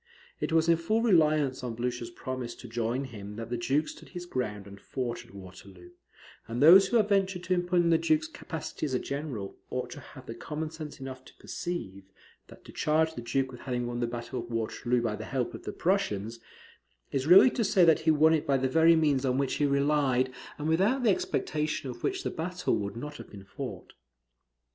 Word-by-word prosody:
It - - -2
was 160 0 +3
in 165 -1 +5
full 215 +8 0
reliance 155 - +3
on 120 -2 -4
Blucher's 120 0 -3
promise 125 0 -5
to 125 - -11
join 120 +3 -1
him 105 -5 -8
that 115 +1 -7
the - - 0
Duke 140 +6 +1
stood - - -10
his 175 -1 -7
ground 105 - -3
and 100 -1 -12
fought 120 -3 -4
at 120 - -19
Waterloo; 90 -1 -12 0.6
and 115 +1 -4
those 180 +7 +8
who 240 - +3
have 215 -2 +2
ventured 190 -3 +1
to 185 - 0
impugn 175 -1 +2
the 165 - +4
Duke's 155 -1 +2
capacity 155 -1 -5
as 130 - -2
a - - +1
general, 140 -9 -5
ought - - -3
to - - -8
have - - -13
had - - -7
common 155 +1 -4
sense 155 -3 -8
enough 130 -1 -7
to - - -16
perceive, 100 - -5 0.4
that - - -16
to - - -11
charge 160 +1 +1
the 120 - -6
Duke 130 +2 -1
with 125 - -11
having 125 -2 -2
won 120 0 -3
the 120 - 0
battle 120 +2 -5
of 120 0 -7
Waterloo 120 +1 -1
by 110 -3 -1
the 110 +1 -7
help 130 -2 -2
of - - -9
the - - -3
Prussians, 115 - -1 0.7
is 135 +1 -1
really 195 +8 +8
to 235 - 0
say 195 -3 +4
that 165 -2 +5
he 160 - 0
won 155 +1 +5
it 155 - 0
by 140 -1 +3
the 130 0 +1
very 165 +4 +5
means 145 -4 +2
on 130 -1 +1
which 140 -1 0
he 145 - +2
relied, 140 -2 +2 0.2
and 150 - -3
without 200 +11 +2
the 220 - +5
expectation 150 -6 -1
of 120 - -11
which 380 0 -1
the - - -2
battle 180 +3 -1
would 100 0 -3
not 150 +5 -6
have - - -11
been 100 -2 -11
fought. 95 - -7
140 Hz, 220 wpm, -29 LUFS, 120-160 Hz, 0.7 s, those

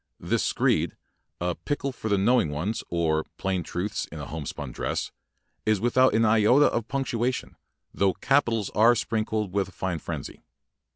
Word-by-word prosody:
This - - 0
screed, - - +1 0.4
"A 90 0 0
Pickle 140 - -3
for 110 -3 -5
the 100 - +3
Knowing 115 -3 +3
Ones, 90 +10 -2
or 80 -2 +1
Plain 95 -2 -1
Truths 95 +5 -3
in 80 - -7
a 70 - -5
Homespun 75 -3 -6
Dress", - - -3 0.5
is 110 -2 +2
without 120 +2 +3
an 115 +1 +4
iota 115 +6 +5
of 115 -1 -2
punctuation, 130 -2 -2 0.4
though 100 -2 +2
capitals 120 -7 +1
are 115 +3 +5
sprinkled 110 -3 -1
with 100 -1 +1
a - - -15
fine 90 -3 -3
frenzy. - - -6
105 Hz, 160 wpm, -26 LUFS, 90-120 Hz, 0.5 s, iota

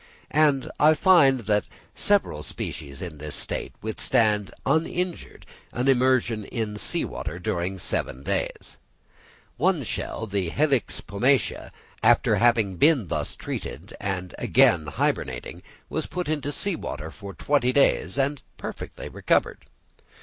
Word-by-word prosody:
And 145 -3 +3
I 155 +2 +6
find 150 -8 +5
that 105 -1 +1 0.3
several 200 - +1
species 70 -1 -6
in 80 -5 -7
this 75 0 -2
state - - -2
withstand 105 -2 +1
uninjured 165 +4 -1 0.3
an 125 +2 -1
immersion 125 -4 +3
in 110 -2 -3
sea 100 - +1
water 75 +3 -5
during 90 +2 -2
seven 70 -6 -3
days. - - -3 0.8
One - - +2
shell, - - -4
the 100 -4 -2
Helix 140 - 0
pomatia, 125 +8 0 0.3
after - - +4
having 115 -6 +3
been 135 - +4
thus - - -2
treated, - - -6
and 90 -3 -3
again 80 -3 +4
hybernating, 65 -3 -2 0.3
was - - -3
put 180 -2 -4
into 145 -2 -1
sea 200 +5 0
water 80 - -6
for 100 +5 -9
twenty 140 -4 +2
days 140 0 +2
and 140 +1 0 0.2
perfectly - - -7
recovered. - - 0
115 Hz, 130 wpm, -25 LUFS, 95-145 Hz, 0.8 s, I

